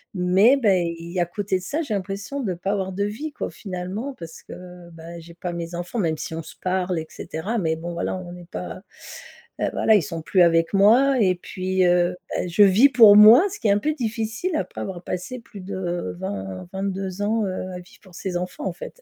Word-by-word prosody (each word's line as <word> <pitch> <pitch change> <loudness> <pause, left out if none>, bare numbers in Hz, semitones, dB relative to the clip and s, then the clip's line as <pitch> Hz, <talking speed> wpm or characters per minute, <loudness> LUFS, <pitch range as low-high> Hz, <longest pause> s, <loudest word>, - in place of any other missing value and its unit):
Mais 190 +9 +4
beh, 185 -8 +2
il 170 +1 -8
y 185 - -2
a - - +4
à - - -3
côté 195 +1 -2
de - - -12
ça, 305 +10 -2
j'ai 225 - -4
l'impression 200 +8 -4
de 195 -6 -2
pas 190 +3 -3
avoir 190 -2 -2
de 200 +2 -1
vie 285 +10 -5
quoi, - - -5
finalement, 195 +8 -5
parce 165 -1 -9
que, 180 -1 -11
bah 165 +1 -10
j'ai 170 +1 -13
pas 175 0 -5
mes 170 0 -5
enfants, 175 +7 -4
même 160 -4 0
si 160 - -6
on 165 - -5
se - - -12
parle 185 -2 -1
et 160 - -5
cetera. 200 +9 -4
Mais 160 -3 0
bon 170 +2 -6
voilà, 170 - -2
on 180 -1 -7
n'est 175 -1 -11
pas, - - -7 0.8
heu, - - +1
voilà, 220 - +4
ils 195 - +3
sont 165 -5 -5
plus 180 +3 +2
avec 165 -1 +3
moi 245 +7 +5
et 185 -2 +4
puis, 185 +1 -2
heu, 175 0 +3 0.2
bah, - - -1
je 175 +4 +1
vis 210 +9 +6
pour 220 -6 +8
moi, 220 - +9
ce - - -8
qui 220 - 0
est - - +5
un 205 - +3
peu 305 +7 0
difficile 235 +7 -3
après - - -3
avoir 185 -3 -5
passé 185 +8 -5
plus 205 -4 -12
de 175 - -4
20-22 185 - -5
ans, 220 +1 +1
heu, 185 0 -4
à 180 - -6
vivre 180 - -17
pour 185 -2 -18
ses 180 -1 -3
enfants, 180 +2 -5
en - - -1
fait. - - -10
185 Hz, 235 wpm, -23 LUFS, 175-210 Hz, 0.8 s, moi